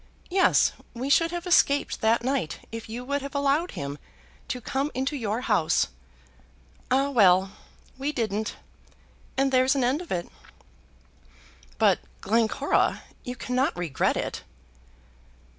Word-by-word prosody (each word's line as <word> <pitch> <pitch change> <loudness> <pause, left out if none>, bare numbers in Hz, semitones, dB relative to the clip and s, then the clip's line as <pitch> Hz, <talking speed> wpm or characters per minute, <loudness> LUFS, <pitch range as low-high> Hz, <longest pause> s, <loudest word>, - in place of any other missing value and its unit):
Yes; 375 +1 +4 0.2
we 260 +4 -2
should 330 +3 +4
have 345 +1 -5
escaped 285 -5 +3
that 225 +1 +3
night 260 - -1
if 225 -1 -7
you 240 +3 -6
would 280 +2 -1
have 280 +1 -7
allowed 285 +5 +1
him 140 +1 -5 0.5
to 250 - -3
come 270 +4 -2
into 265 +3 -1
your 225 -3 -2
house. 210 - +2 1.0
Ah, 275 +2 +2
well! 190 -5 +5 0.5
we 280 +2 -1
didn't, 220 -5 -2 0.8
and 270 0 +2
there's 260 +1 +4
an 270 - +1
end 260 +7 +1
of 355 - -11
it." 175 -1 -2 1.5
"But - - +4 0.2
Glencora, 230 +6 +1 0.2
you 250 -1 -5
cannot 250 -1 -1
regret 165 -7 0
it." - - -3
255 Hz, 130 wpm, -26 LUFS, 220-280 Hz, 1.5 s, well